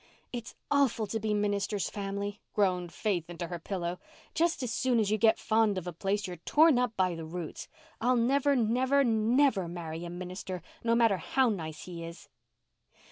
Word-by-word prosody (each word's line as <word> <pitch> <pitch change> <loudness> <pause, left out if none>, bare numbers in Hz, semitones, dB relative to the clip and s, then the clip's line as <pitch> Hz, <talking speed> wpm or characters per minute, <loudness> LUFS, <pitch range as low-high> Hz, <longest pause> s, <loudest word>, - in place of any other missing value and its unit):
"It's 235 -3 -6 0.2
awful 275 -6 +3
to 220 +2 -3
be 215 0 -1
minister's 205 -1 0
family," 200 0 -4
groaned 180 -4 +1
Faith 180 -6 -1
into 175 0 -5
her 175 -1 -4
pillow. 175 0 -3 0.3
"Just 330 -4 +1
as 235 -3 -2
soon 245 +1 +2
as 210 -2 +1
you 215 - +1
get 220 0 +5
fond 220 -2 +2
of 185 - -4
a 175 - -4
place 195 +4 -1
you 180 - -5
are - - -9
torn 295 - +4
up 250 -3 -1
by 185 -2 +2
the 165 -1 -6
roots. 165 0 -6 0.3
I'll 250 +2 +3
never, 275 +4 +3
never, 255 +4 +3
never 225 -2 +3
marry 165 -1 -6
a 175 - -5
minister, 180 0 -6 0.2
no 230 0 +3
matter 230 -4 +4
how 260 +8 +2
nice 160 -7 -4
he 170 -2 -7
is." 165 +1 -10
205 Hz, 190 wpm, -30 LUFS, 180-235 Hz, 0.3 s, get